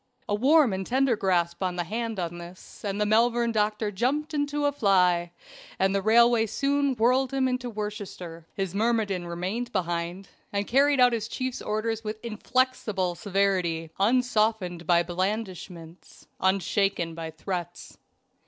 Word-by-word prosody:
A - - -1
warm 265 +2 +4
and 190 0 -2
tender 260 +3 +2
grasp 175 -4 0
of 185 -1 -1
the 175 - -1
hand 225 +3 -3
on 175 -1 -4
this, 175 +2 -12
and 200 -1 -2
the 210 - +2
Malvern 235 +2 +3
doctor 210 -1 0
jumped 275 +10 -1
into 290 0 -1
a 285 - +3
fly, 180 -8 +2 0.5
and 190 +1 +2
the 195 - +1
railway 230 +2 +4
soon 280 +3 0
whirled 250 +3 +2
him 270 -1 +1
into 250 -1 -2
Worcestershire. 200 -6 -6
His 190 -3 -3
myrmidon 205 -4 0
remained 190 +8 -3
behind 175 0 -3 0.2
and 200 0 -1
carried 280 +4 +3
out 250 -1 +6
his 220 -2 -2
chief's 255 +1 -4
orders 220 +1 -2
with 215 0 -4
inflexible 220 -5 0
severity, 185 -5 0
unsoftened 215 -6 +1
by 175 -1 +4
blandishments, 180 -2 -5
unshaken 190 -2 +1
by 165 0 -6
threats. 175 +2 -6
205 Hz, 145 wpm, -26 LUFS, 180-235 Hz, 0.5 s, out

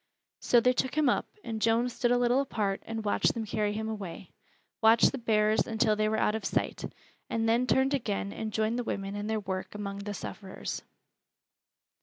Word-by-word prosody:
So 240 - +4
they 250 +2 +3
took 260 +2 -1
him 305 -2 +4
up, - - +1 0.2
and 220 -1 -4
Joan 230 +2 +3
stood 245 0 0
a 245 - +4
little 245 +2 +3
apart 210 -7 -2
and 225 -1 -4
watched 205 - +2
them 225 -1 -3
carry 210 0 0
him 220 +1 -3
away, 205 -6 -6 0.5
watched 225 +1 +6
the 270 - -5
bearers 215 -2 +2
until 220 -1 +2
they 215 0 +1
were 220 - 0
out 210 - +2
of 220 -1 -3
sight, - - -1 0.5
and 225 0 0
then 235 +3 +2
turned 265 +2 +3
again 205 -6 -2
and 220 -1 -4
joined 220 +3 0
the - - -1
women 195 -3 -3
in 205 0 -4
their 220 0 0
work 190 0 -4
among 200 -1 -5
the 205 0 -5
sufferers. 195 -2 -6
220 Hz, 200 wpm, -29 LUFS, 205-235 Hz, 0.5 s, watched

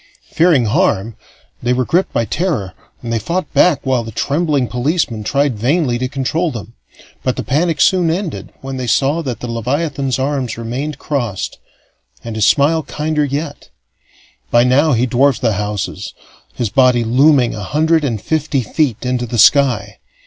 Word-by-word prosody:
Fearing 160 -7 +3
harm, 115 - +1 0.5
they 120 +1 +1
were 125 0 0
gripped 180 +8 +1
by 115 - 0
terror, 130 - -2 0.3
and 115 -1 -3
they 115 - +1
fought 180 +9 -3
back 175 -6 +3
while 130 -3 +1
the 110 - -7
trembling 145 +2 0
policemen 125 -3 -1
tried 140 -1 0
vainly 130 0 +1
to 130 - -1
control 145 +6 -1
them; 115 -4 -8 0.5
but 130 - 0
the - - -4
panic 155 +2 0
soon 180 +1 +3
ended 175 0 -3
when 135 0 -6
they 125 -1 -4
saw 140 +7 +1
that 130 -6 -5
the 125 - -4
leviathan's 135 +3 -2
arms 135 -3 -2
remained 130 +6 -4
crossed 120 -11 -3 0.6
and 115 -1 -6
his 110 -1 +2
smile 155 +5 +3
kinder 150 0 -2
yet. 145 +1 -4 0.8
By 120 0 +4
now 140 +4 +3
he 120 +1 +2
dwarfed 130 +2 +2
the 115 -3 +2
houses, 105 -1 -4 0.4
his 120 -4 -2
body 125 -3 +4
looming 130 +2 +3
a 105 - -6
hundred 155 - +1
and 120 -6 -1
fifty 150 +1 -1
feet 125 0 -1
into 125 -1 -1
the 120 - -3
sky. 125 -3 +3
135 Hz, 165 wpm, -17 LUFS, 120-150 Hz, 0.8 s, By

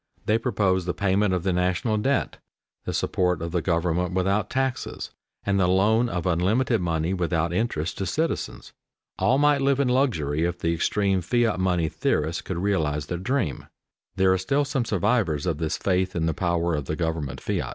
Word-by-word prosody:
They 110 +2 +2
proposed 95 -6 0
the 90 - -1
payment 100 0 +1
of 90 -2 0
the 95 -1 +1
national 90 +5 0
debt, 135 +6 0 0.5
the - - -2
support 90 -2 0
of 85 0 -4
the 90 0 0
government 90 +1 0
without 95 +2 +1
taxes, 135 -1 -2 0.3
and 100 0 +1
the 90 - +3
loan 110 +6 +3
of 85 -6 -3
unlimited 100 +7 +1
money 85 0 0
without 85 -2 0
interest 85 -6 -2
to 95 - -2
citizens. 160 - -3 0.5
All 130 - +3
might 145 -1 +3
live 140 0 +2
in 140 -3 +2
luxury 85 - +1
if 85 +1 -1
the 85 -2 0
extreme 95 +3 +1
fiat 115 +2 +1
money 90 -3 +1
theorists 80 +1 -1
could 90 - -5
realize 80 -6 0
their 85 - -4
dream. 120 - -2 0.5
There 95 0 +4
are 95 - 0
still 140 +10 +1
some 135 -3 -1
survivors 100 - +1
of 80 -4 -1
this 80 -1 -1
faith 95 0 0
in 80 -2 0
the 80 - +1
power 85 -1 0
of 75 -3 -2
the 80 - -2
government 80 -4 -3
fiat. - - -2
95 Hz, 185 wpm, -25 LUFS, 85-110 Hz, 0.5 s, There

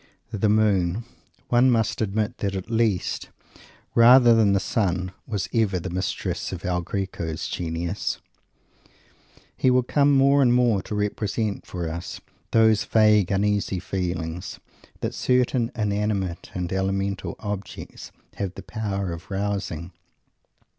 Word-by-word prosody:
The 105 -1 +1
moon 105 -2 +2 0.5
one 125 +2 +5
must 115 -2 +1
admit 105 0 -1
that, 100 -1 -2
at 95 +4 -5
least 110 -5 0 0.6
rather 120 +1 +7
than 110 -3 +4
the 100 - +3
sun, 95 -3 -1 0.2
was 105 -4 -2
ever 105 -5 +2
the 85 - -5
mistress 90 +1 -3
of - - -6
El 90 -1 0
Greco's 85 -4 -4
genius. 85 +2 -3 1.4
He 130 - +2
will 125 0 +4
come 145 +3 +3
more 140 +1 +5
and 120 -2 +4
more 120 -5 +3
to 105 - -6
represent 105 0 -2
for 90 -2 -4
us 85 +2 -6 0.3
those 110 -2 +4
vague 105 -4 +4
uneasy 100 -1 0
feelings 90 -1 -4 0.4
that - - -2
certain 125 -1 +1
inanimate 100 -4 -1
and 90 -1 -3
elemental 95 +1 -1
objects 105 -2 -7 0.3
have 95 -2 -3
the - - -8
power 100 -5 -3
of 85 +3 -10
rousing. 95 -4 -3
100 Hz, 130 wpm, -24 LUFS, 95-110 Hz, 1.4 s, rather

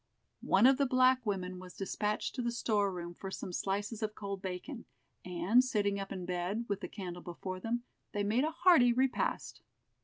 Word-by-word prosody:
One 195 +5 +5
of 265 0 +7
the 280 - +3
black 255 0 +4
women 185 -2 -2
was 185 0 -11
despatched 210 +2 -2
to 255 - -3
the 235 0 0
store 210 -4 +1
room 175 -1 -6
for 195 +2 -7
some 185 -1 -6
slices 205 +4 -2
of 215 -1 -2
cold 200 -2 -5
bacon, 190 +7 -6 0.4
and 180 +7 +3
sitting 205 -5 0
up 195 - -5
in 185 -2 -4
bed, 180 +6 -2
with 200 -1 -2
the - - -4
candle 180 -3 -7
before 185 +2 -6
them, 235 +4 -2 0.3
they 205 - -1
made 220 +6 +2
a 310 - +1
hearty 325 -7 +5
repast. 260 +1 0
205 Hz, 190 wpm, -33 LUFS, 185-240 Hz, 0.4 s, of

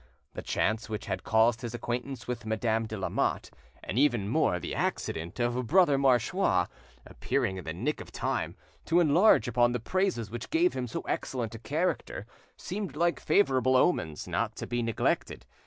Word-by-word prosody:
The - - -5
chance 110 +1 -1
which 105 -2 -4
had 95 - -3
caused 115 +1 +3
his 120 -1 -5
acquaintance 120 +2 -4
with 125 -1 -4
Madame 110 0 0
de 110 - -5
Lamotte, 95 - -1 0.3
and 110 - -2
even 120 -8 +2
more - - +2
the - - -5
accident 85 +7 -3
of 120 0 0
Brother 175 -2 +5
Marchois 130 -4 +2 0.4
appearing 125 -9 -1
in 90 - -8
the 80 - -3
nick 120 - -2
of - - -11
time, - - -2 0.3
to 170 +2 +3
enlarge 165 - +5
upon 120 +1 +3
the 125 - -1
praises 125 - -1
which 120 - -6
gave 345 +2 +3
him 125 - -3
so 115 - -4
excellent 120 -4 -3
a 115 - -8
character, 155 +10 -2 0.3
seemed 190 -6 -5
like 170 +2 +1
favourable 130 -9 +3
omens 80 - +1
not - - -1
to - - -5
be 120 0 -2
neglected. 115 -1 -1
120 Hz, 170 wpm, -29 LUFS, 110-145 Hz, 0.4 s, Brother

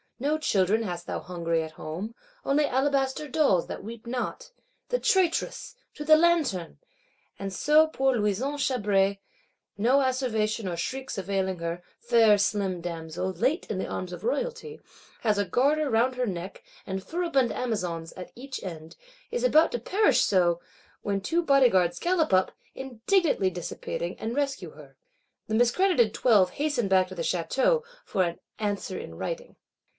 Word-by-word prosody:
No 290 +4 +1
children 210 -4 +2
hast 175 -4 -5
thou - - -3
hungry 170 -2 -2
at 160 - -7
home; 175 +10 -6 0.3
only 290 +2 +2
alabaster 270 +2 0
dolls, 270 - +2
that - - -6
weep 230 +2 -9
not! 255 - -4 0.4
The - - +1
traitress! 370 +3 +1 0.2
To 300 - -6
the 310 +1 +7
Lanterne!—And 335 - -2
so 305 +8 +4
poor 270 -4 +1
Louison 225 +7 0
Chabray, 200 -7 +1 0.6
no 245 +7 +4
asseveration 230 -5 0
or - - -3
shrieks 265 +9 -4
availing 190 -1 -1
her, 170 +1 -4 0.2
fair 230 -3 +5
slim 195 -3 0
damsel, 170 +2 -4
late 255 - 0
in 215 - -2
the - - -2
arms 180 -1 -5
of - - -8
Royalty, 480 -2 -3 0.4
has 215 -3 +2
a 205 - +1
garter 290 +8 +2
round 245 +2 +2
her 250 -1 -1
neck, 185 0 -6 0.2
and 190 0 -4
furibund 325 - 0
Amazons 175 -9 -3
at 180 - -9
each 260 +2 -7
end; 165 -4 -8 0.4
is 485 +1 -2
about 325 -10 +5
to 240 - -2
perish 400 - +3
so,—when 185 +2 -1
two 335 - 0
Bodyguards 240 - +4
gallop 345 -2 +1
up, 185 0 +3 0.2
indignantly 265 - +1
dissipating; 485 - -5
and 225 +2 -3
rescue 280 -2 -2
her. - - -15 0.5
The 220 - -1
miscredited 245 - +3
Twelve 205 -7 +4
hasten 285 -7 -1
back 190 -1 +3
to 185 - -9
the 170 - -4
Château, 265 - +1 0.2
for 190 - 0
an 170 -1 -3 0.2
"answer 205 -2 -2
in - - -8
writing." - - -5
230 Hz, 150 wpm, -27 LUFS, 190-290 Hz, 0.6 s, the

